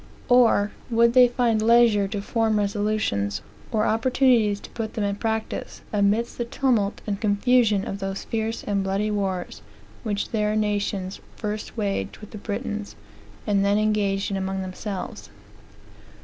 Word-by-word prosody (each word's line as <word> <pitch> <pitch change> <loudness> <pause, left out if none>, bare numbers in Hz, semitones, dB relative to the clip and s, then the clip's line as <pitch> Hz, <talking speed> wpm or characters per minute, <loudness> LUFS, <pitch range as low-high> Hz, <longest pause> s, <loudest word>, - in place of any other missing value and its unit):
Or, 235 -4 +5 0.2
would 235 0 +4
they 250 -1 +8
find 235 -3 +1
leisure 225 -3 +5
to 200 0 -4
form 225 0 +1
resolutions, 205 - -1 0.3
or 215 -1 +1
opportunities 225 -3 +3
to - - -11
put 225 -2 -5
them 215 - -1
in 200 0 -1
practice, 220 0 -3
amidst 210 +4 +1
the 240 - 0
tumult 235 -5 0
and 200 -1 -3
confusion 215 0 +3
of 195 - -4
those 195 0 -4
fierce 225 0 -3
and 200 -2 0
bloody 195 +2 0
wars, 190 -3 -2 0.4
which 205 -3 -2
their 210 -1 0
nations 205 -3 -1 0.2
first 210 +1 -5
waged 195 - -2
with 210 - -12
the 210 - -8
Britons, 205 0 -4 0.5
and 200 -2 +2
then 200 +1 +3
engaged 205 -2 +1
in 195 - -1
among 190 0 -2
themselves? 185 +1 -6
210 Hz, 150 wpm, -24 LUFS, 200-225 Hz, 0.5 s, they